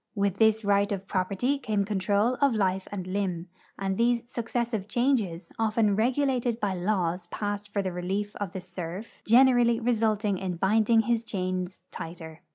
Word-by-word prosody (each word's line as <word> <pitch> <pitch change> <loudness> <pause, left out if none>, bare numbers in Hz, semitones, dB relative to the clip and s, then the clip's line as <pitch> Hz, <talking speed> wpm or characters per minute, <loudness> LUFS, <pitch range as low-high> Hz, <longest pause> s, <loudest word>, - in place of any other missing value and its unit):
With 200 -2 0
this 220 0 +3
right 200 +1 +3
of 195 -1 -3
projAcrty 200 +9 0
came 210 -4 0
control 205 +4 +1
of 280 -4 +4
life 190 -2 0
and 190 -3 -4
limb, 185 -2 -2 0.3
and 195 -1 -2
these 235 0 +1
successive 235 -3 -2
changes, 230 -9 0
often 220 -2 +2
regulated 245 0 +1
by 200 -4 -1
hiAvs 180 -2 -1
passed 205 0 -4
for 200 -1 -1
the 185 - -2
relief 195 +4 -3
of 200 -4 -4
the 190 - -5
serf, 180 +3 -7
generally 240 -1 +5
resulted 215 -4 +1
in 185 -2 -3
binding 220 +5 +3
his 230 +1 0
chains 185 -3 -3
tighter. 160 -1 -8
205 Hz, 160 wpm, -27 LUFS, 185-230 Hz, 0.3 s, generally